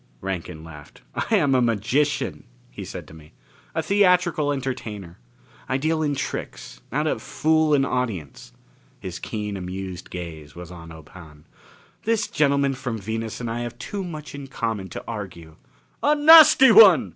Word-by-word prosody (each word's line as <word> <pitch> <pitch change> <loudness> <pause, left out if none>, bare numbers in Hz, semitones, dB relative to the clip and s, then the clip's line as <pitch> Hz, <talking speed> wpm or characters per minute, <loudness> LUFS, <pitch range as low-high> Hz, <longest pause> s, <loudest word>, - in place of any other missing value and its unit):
Rankin 90 -3 -5
laughed. 75 -3 -13
"I 225 - 0
am 145 -9 +2
a 130 - +3
magician," 120 +6 0 0.3
he - - -8
said - - -8
to - - -14
me. 80 -1 -16 0.4
"A 160 - 0
theatrical 180 -5 +2
entertainer. 110 -10 -5 0.5
I 130 - +1
deal 155 +3 0
in 145 -2 0
tricks - - -6
how - - 0
to - - -1
fool 155 0 +1
an 135 -1 +2
audience 105 - -4 0.3
" - - -33
His - - -7
keen, 105 -2 -5
amused 95 -1 -7
gaze 80 -4 -8
was 90 0 -10
on 85 -2 -11
Ob 80 -2 -13
Hahn. 75 -5 -14 0.6
"This 225 -1 0
gentleman 140 -2 +1
from 125 -3 -4
Venus 110 +2 -5
and 120 - -4
I 115 +1 -3
have 120 0 -6
too 200 +10 -5
much 155 -4 -8
in 140 -1 -8
common 110 -7 -4
to - - -7
argue." 90 -8 -8 0.4
"A 295 +1 +3
nasty 300 -4 +8
one!" 190 - +7
120 Hz, 165 wpm, -23 LUFS, -, 0.6 s, nasty